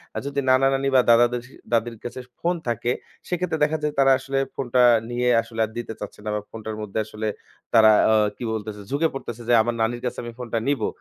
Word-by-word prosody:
আর - - -2
যদি 140 0 -2
নানা-নানি 135 +1 +3
বা 130 - +7
দাদা-দাদী, 120 +1 +3 0.2
দাদীর 115 0 0
কাছে 120 +1 -6 0.2
ফোন 175 +1 0
থাকে 120 +1 0 0.4
সেক্ষেত্রে 180 -2 -1
দেখা 155 +1 +2
যায় 150 -1 0
তারা 135 0 +6
আসলে 135 0 -2 0.2
ফোনটা 125 -1 +1 0.3
নিয়ে 125 0 0
আসলে 115 0 -10
আর 110 - -11
দিতে 115 -1 -4
চাচ্ছে 105 0 -8
না। - - -2
বা 105 - -2
ফোনটার 110 -1 -6
মধ্যে 105 +1 -3
আসলে 110 0 -5 0.5
তারা 110 -1 +7 0.2
আ - - +5 0.2
কি - - -7
বলতেছে 105 -1 -5
ঝুঁকে 155 +4 +2
পড়তেছে 120 -3 -6
যে - - +5
আমার 120 +1 -1
নানির 120 +2 0
কাছে - - -8
আমি 120 - -6
ফোনটা 120 -2 -3
নিবো। 140 -6 +1
120 Hz, 205 wpm, -23 LUFS, 110-135 Hz, 0.5 s, বা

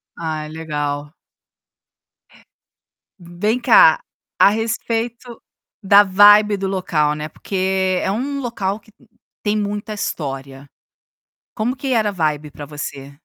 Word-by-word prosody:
Ai 155 -2 -4
legal. 150 -2 -4 2.1
Vem 180 +8 -2
cá, - - +6 0.4
a - - +7
respeito 230 +2 -3 0.4
da 200 +1 +6
vibe 205 +2 +6
do 195 0 -3
local, 155 -6 0
né, 150 0 -5
porque 190 -1 -1
é 190 - -1
um 275 +6 -3
local 215 -5 -3
que 215 - -23 0.5
tem 210 0 0
muita 210 +1 -3
história. 135 -7 -5 0.9
Como 240 +4 -1
que 275 - -6
era 215 -3 +2
a - - -3
vibe 150 -4 -2
pra 145 - -9
você? 140 -2 -7
195 Hz, 120 wpm, -19 LUFS, 150-215 Hz, 2.1 s, a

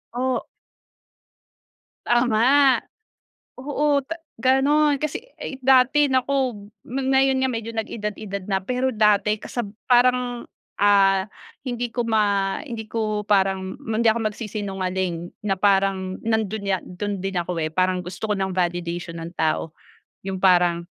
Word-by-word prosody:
O 255 0 -1 1.6
Tama. 245 +3 +4 0.8
Oo 290 +2 +1
ta 330 - -4 0.2
ganun. 280 +4 +3
Kasi 305 -1 -2 0.2
ay 265 - -6
dati 265 +2 +4
naku 265 -1 +1 0.3
ma 270 +3 -3
ngayon 265 0 +3
nga 260 - +2
medyo 230 -2 -4
nag-edad-edad 210 -3 -4
na 195 -2 -1
pero 250 +4 -1
dati 210 -1 +3
kasab 240 -3 -4 0.2
parang 245 -1 +3 0.3
ah, 195 -1 +4 0.4
hindi 245 -1 -3
ko 240 0 -2
ma 205 -3 +1
hindi 230 -7 -7
ko 215 -2 -2
parang 190 -2 +1
ma 220 -1 -2
hindi 235 - +1
ako 220 -1 +2
magsisinungaling 190 -5 -4
na 195 -3 -1
parang 195 -1 +1
nandun 220 -2 -1
ya 190 - +2
dun 200 +2 -4
din 195 +1 -4
ako 175 0 -4
eh, 155 -1 -2
parang 185 +1 +2
gusto 190 +4 -5
ko 205 - +1
ng 190 -1 -2
validation 175 -1 -2
ng 165 +2 -7
tao. 160 0 -1 0.5
Yung 190 -1 -4
parang 175 -2 +4
215 Hz, 135 wpm, -23 LUFS, 190-250 Hz, 1.6 s, Tama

